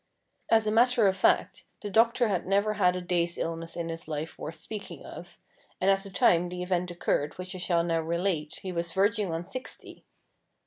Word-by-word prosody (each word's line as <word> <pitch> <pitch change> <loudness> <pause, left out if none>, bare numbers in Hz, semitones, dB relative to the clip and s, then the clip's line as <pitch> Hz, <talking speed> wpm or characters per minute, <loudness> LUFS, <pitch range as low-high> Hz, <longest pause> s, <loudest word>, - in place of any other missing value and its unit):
As 225 -1 +4
a 215 - +1
matter 235 0 +4
of 190 - +2
fact, 190 - +2 0.2
the 205 - -3
doctor 230 +3 +4
had 185 -4 -1
never 200 +2 +2
had 180 -3 +3
a 180 - -3
day's 175 -1 0
illness 165 0 -4
in 170 -1 -3
his 165 0 -6
life 155 0 -4
worth 160 - -6
speaking 210 +2 -8
of, - - -10 0.4
and 190 +1 +4
at 195 0 +2
the 200 - -10
time 175 -2 +3
the 180 0 -4
event 180 -1 -1
occurred 160 -4 -1
which 180 +1 -6
I 185 - -7
shall 175 -1 +1
now 165 -1 +1
relate, 165 -1 -2
he 190 - -4
was 170 -1 -3
verging 205 -1 +1
on 165 +1 -3
sixty. 255 +8 -8
180 Hz, 205 wpm, -28 LUFS, 170-200 Hz, 0.4 s, As